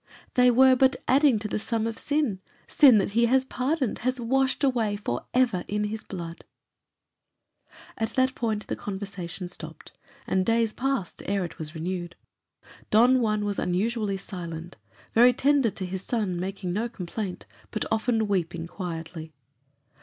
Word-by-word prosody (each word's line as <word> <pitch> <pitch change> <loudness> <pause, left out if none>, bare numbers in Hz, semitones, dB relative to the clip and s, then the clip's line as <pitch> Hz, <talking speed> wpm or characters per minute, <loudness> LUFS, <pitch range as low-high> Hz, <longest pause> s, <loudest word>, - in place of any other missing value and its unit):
"They 250 0 +5
were 260 +2 +6
but 260 +1 +4
adding 270 -2 +5
to 210 0 -3
the 210 - -2
sum 225 0 -1
of 225 0 -2
sin; 285 -10 0 0.3
sin 265 -7 +7
that 200 -1 +1
he 235 +3 +3
has 260 +2 +3
pardoned, 265 0 -1
has 255 +2 -1
washed 265 +4 +1
away 235 -6 +2
for 125 - -4
ever 245 -8 +2
in 210 +1 -1
his 215 +1 -3
blood." 170 -3 -7 1.6
At 225 0 0
that 260 0 +3
point 220 -4 -2
the - - -3
conversation 190 -3 -5
dropped, - - -10 0.3
and 190 0 +1
days 230 +1 +1
passed 265 -8 -2
ere 200 -2 0
it 170 - -10
was 155 +1 -6
renewed. 175 +1 -4 0.7
Don 245 +4 +5
Juan 215 -2 +1
was 205 -1 -2
unusually 205 +2 0
silent; 175 -3 -6 0.4
very 245 +2 +6
tender 275 -1 +3
to 190 -2 -5
his 185 0 -4
son, 200 -6 -2
making 185 -1 -3
no 225 +5 -1
complaint, 190 -1 -5 0.2
but 215 - -2
often 220 0 +1
weeping 175 -4 -1
quietly. 165 -3 -6
215 Hz, 155 wpm, -26 LUFS, 185-245 Hz, 1.6 s, sin